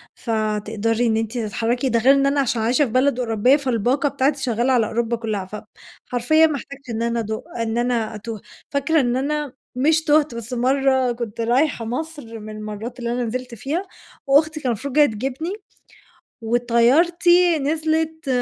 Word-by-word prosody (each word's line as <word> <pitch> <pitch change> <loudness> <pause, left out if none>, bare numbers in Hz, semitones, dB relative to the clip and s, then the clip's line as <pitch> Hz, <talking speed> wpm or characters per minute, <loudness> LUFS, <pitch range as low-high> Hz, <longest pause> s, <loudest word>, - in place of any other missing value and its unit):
فتقدري 220 +1 -1
إن 220 0 +2
أنتِ 225 +2 -2
تتحركي. 235 +3 -1
ده 230 0 +2
غير 265 +4 +6
إن 275 0 +2
أنا 280 +1 +2
عشان 240 -3 -1
عايشة 250 +6 +2
في 230 - -6
بلد 255 +1 +2
أوروبية؛ 235 +2 +3
فالباقة 260 +1 0
بتاعتي 275 +1 0
شغالة 245 +1 +1
على 235 -3 +3
أوروبا 235 +1 -1
كلها، 215 -4 -3 0.6
فحرفيًا 280 +7 +3
ما 310 - -2
أحتاجتش 275 0 -9
إن 225 -1 -3
أنا 235 0 0
أد 220 -1 -4 0.3
إن 225 0 -2
أنا 240 -2 0
أتوه. 215 0 -7 0.3
فاكرة 300 +3 +2
إن 245 -1 0
أنا، 290 +1 -2 0.2
مش 310 +5 +2
تُوهت، 300 -4 +2
بس 235 +2 -6
مرة 260 0 +2
كنت 230 -2 -5
رايحة 240 +1 +1
مصر 255 -2 -5
من 215 0 -8
المرات 215 +4 -7
اللي 235 -1 -3
أنا 245 +1 -1
نزِلت 250 +1 -5
فيها، 295 - -3 0.4
وأختي 300 +3 +4
كانت 300 - -14
المفروض 255 +3 -2
جاية 300 +1 +6
تجيبني، 270 - -3 0.9
وطيارتي 315 +10 +3
نزلِت، 315 +1 -1
250 Hz, 165 wpm, -21 LUFS, 230-285 Hz, 0.9 s, غير